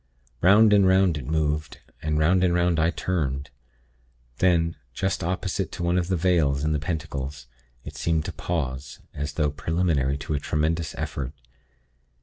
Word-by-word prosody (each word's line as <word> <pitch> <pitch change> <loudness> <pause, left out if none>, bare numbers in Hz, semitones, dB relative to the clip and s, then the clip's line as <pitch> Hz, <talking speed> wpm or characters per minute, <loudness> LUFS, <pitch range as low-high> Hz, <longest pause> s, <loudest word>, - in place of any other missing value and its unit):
"'Round 105 +4 +6
and 100 -2 +5
'round 95 -4 +3
it 65 - -8
moved, 75 -1 -1 0.2
and 75 0 -1
'round 90 +4 +3
and 90 -1 +3
'round 85 -2 +2
I 80 +2 +3
turned. 70 -6 -2 0.9
Then, 85 -2 +3 0.2
just 95 -2 -1
opposite 95 +2 -2
to 85 - -4
one 85 +1 +2
of 85 - -2
the 95 - +1
Vales' 80 -6 +2
in 75 - +1
the 75 - 0
pentacles, 70 -3 -4 0.4
it - - -9
seemed 80 -2 0
to - - -4
pause, 70 -6 -4
as 75 +1 -4
though 75 -2 +1
preliminary 80 -3 0
to 75 +2 -4
a 75 - 0
tremendous 80 +2 -1
effort. 70 0 -4
80 Hz, 160 wpm, -25 LUFS, 75-90 Hz, 0.9 s, Round